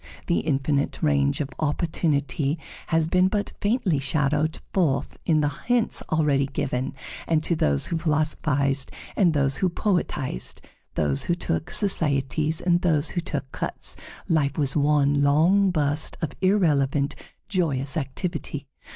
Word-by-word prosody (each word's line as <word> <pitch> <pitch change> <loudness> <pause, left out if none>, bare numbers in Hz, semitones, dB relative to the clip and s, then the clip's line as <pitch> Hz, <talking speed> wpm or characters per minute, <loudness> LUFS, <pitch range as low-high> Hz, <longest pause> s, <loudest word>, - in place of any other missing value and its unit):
The 170 - +1
infinite 140 +1 0
range 140 -1 +2
of 140 - -4
opportunity 150 -2 0 0.3
has 160 -1 +2
been 185 +2 +3
but 205 +1 -2
faintly 205 - +1
shadowed 150 +2 0 0.2
forth 155 -8 0
in 155 -2 +4
the 145 - +2 0.2
hints 245 -2 +2
already 145 -3 +2
given; 135 -1 -2 0.3
and 160 -2 +2
to 170 - +1
those 70 - +1
who 165 - -2
philosophized 145 -3 0 0.2
and 175 -5 +4
those 140 -1 +2
who 185 - +2
poetized, 175 - -2 0.4
those 70 -2 0
who 175 - +1
took 165 -1 -2
societies 155 -4 0
and 175 -1 +2
those 160 -4 +2
who 175 - -2
took 140 -5 -4
cuts, - - -4 0.3
life 145 -4 +1
was 140 -3 0
one 145 -1 +3
long 165 +8 +4
burst 150 -2 0
of 160 -4 -2
irrelevant, 145 -7 +2 0.3
joyous 145 -8 0
activity. 155 0 -3
150 Hz, 135 wpm, -25 LUFS, 140-170 Hz, 0.4 s, in